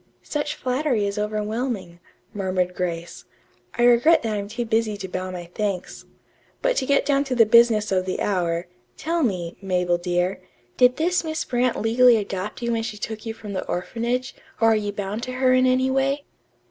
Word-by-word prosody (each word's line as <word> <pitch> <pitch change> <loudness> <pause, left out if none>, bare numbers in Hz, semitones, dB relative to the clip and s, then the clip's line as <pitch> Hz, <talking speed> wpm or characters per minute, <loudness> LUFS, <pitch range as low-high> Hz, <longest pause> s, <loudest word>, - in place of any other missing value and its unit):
"Such 295 0 -3
flattery 255 -4 0
is 200 +1 -2
overwhelming," 210 -3 -3 0.3
murmured 185 -2 -1
Grace. 170 -2 -4 0.5
"I 240 - +1
regret 245 +7 +5
that 225 -2 -1
I'm 200 -1 -3
too 235 +3 -4
busy 220 -2 0
to 195 - -6
bow 185 0 -4
my 175 -2 -7
thanks. 200 -4 -3 0.6
But - - +2
to 260 - 0
get 280 - +3
down 280 -1 +2
to 260 -2 -2
the 230 -2 +6
business 220 -2 +5
of 185 -1 +1
the 185 - -2
hour 175 -3 0 0.3
tell 335 +2 -1
me, 180 - -1
Mabel, 180 -2 0
dear 180 +2 -1 0.3
did 250 0 +4
this 350 +3 +1
Miss 315 0 -3
Brant 245 -1 0
legally 235 +2 +5
adopt 205 +2 -4
you 235 - 0
when 230 -1 0
she 220 -2 -5
took 220 +2 -6
you 225 - -4
from 210 -2 -8
the 185 - -2
orphanage, 240 +8 -2 0.3
or 225 - +5
are - - +4
you 205 -1 -1
bound 205 +2 -4
to 255 +1 -5
her 255 0 +3
in 255 0 +4
any 260 +1 +2
way?" 275 +2 +1
220 Hz, 190 wpm, -23 LUFS, 190-255 Hz, 0.6 s, the